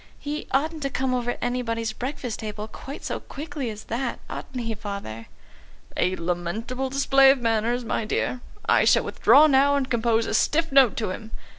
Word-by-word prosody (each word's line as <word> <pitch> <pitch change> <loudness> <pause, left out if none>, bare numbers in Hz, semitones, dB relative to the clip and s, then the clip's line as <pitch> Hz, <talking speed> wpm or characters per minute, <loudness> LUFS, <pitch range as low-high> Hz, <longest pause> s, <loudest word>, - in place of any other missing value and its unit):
"He 295 +1 -5
oughtn't 310 +4 0
to 275 - -1
come 260 -1 -1
over 245 -1 -1
anybody's 230 -2 -1
breakfast 250 -1 -5
table 215 -1 -5
quite 270 +6 -9
so - - -2
quickly 290 -3 -6
as 215 -1 -7
that. 240 +2 -3
Ought - - -6
he, 230 -2 -2
Father?" 200 - -7 0.7
"A 185 +1 +1
lamentable 185 +10 -3
display 275 0 +5
of 275 - +5
manners, 235 +1 0
my 230 - -1
dear. 245 +3 -1 0.2
I - - +4
shall - - +4
withdraw 295 +2 +5
now 285 -1 +4
and 270 -2 -1
compose 230 -1 +2
a - - -3
stiff 325 +1 +2
note 270 -5 +5
to 215 -5 -1
him. 220 +3 -7
245 Hz, 175 wpm, -25 LUFS, 220-270 Hz, 0.7 s, display